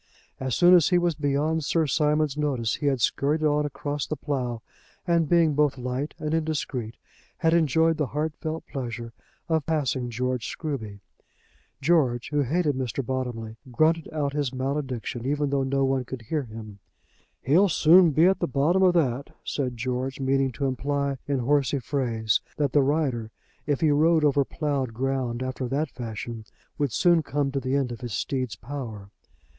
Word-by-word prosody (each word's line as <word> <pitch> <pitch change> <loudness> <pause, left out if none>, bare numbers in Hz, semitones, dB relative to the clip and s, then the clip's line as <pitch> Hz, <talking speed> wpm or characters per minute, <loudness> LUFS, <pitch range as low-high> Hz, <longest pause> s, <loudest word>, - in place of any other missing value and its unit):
As 130 -1 -1
soon 175 0 +6
as 175 -5 +6
he 180 - +4
was 175 -1 +2
beyond 150 +2 0
Sir 160 +2 +1
Simon's 150 0 +1
notice, 140 -7 0
he 145 - -2
had 135 -3 +1
scurried 150 +7 +1
on 150 -1 +2
across 145 0 -4
the 155 - -2
plough, 125 -7 -3 0.4
and 170 -3 +2
being 170 -3 +4
both 145 -2 +2
light 125 +4 -3
and 155 0 -3
indiscreet, 145 -8 -2 0.4
had 165 0 +2
enjoyed 160 0 +3
the 150 -3 0
heartfelt 155 +2 -3
pleasure 120 -3 -6 0.3
of 160 -4 0
passing 135 -6 0
George 125 0 -2
Scruby. 110 -10 -5 0.8
George, 135 -6 +2
who 150 -1 +1
hated 150 +3 +1
Mr. 130 0 -3
Bottomley, 120 -3 -4
grunted 160 +5 +2
out 145 -3 -1
his 145 -3 -1
malediction, 130 -3 -3
even 145 +1 0
though 140 -1 +1
no 135 +1 +1
one 135 -1 +1
could 125 -1 -8
hear 150 +7 -1
him. 110 -3 -10 0.6
"He'll 180 +9 +4
soon 170 +2 +6
be 155 +3 +4
at 190 0 +3
the - - 0
bottom 150 +8 +2
of 180 -2 +4
that," 140 -4 +1
said 125 -4 -3
George, 130 +3 -3
meaning 135 0 +1
to 140 - -2
imply 140 +1 -1
in 140 -1 0
horsey 140 +2 +2
phrase 115 -5 0 0.2
that 145 -3 +1
the 145 - +5
rider, 135 -6 0 0.4
if 145 -2 0
he 155 -2 +4
rode 155 +2 +4
over 140 -1 +3
ploughed 135 -5 -2
ground 130 -1 -1
after 130 0 -3
that 140 +3 -1
fashion, 115 -1 -6 0.4
would 145 -3 +1
soon 170 - +4
come 145 -2 -1
to 135 - -1
the 130 +1 -1
end 135 -3 0
of 120 - -7
his 120 -4 -5
steed's 130 +3 -2
power. 110 -5 -7
140 Hz, 170 wpm, -26 LUFS, 125-155 Hz, 0.8 s, soon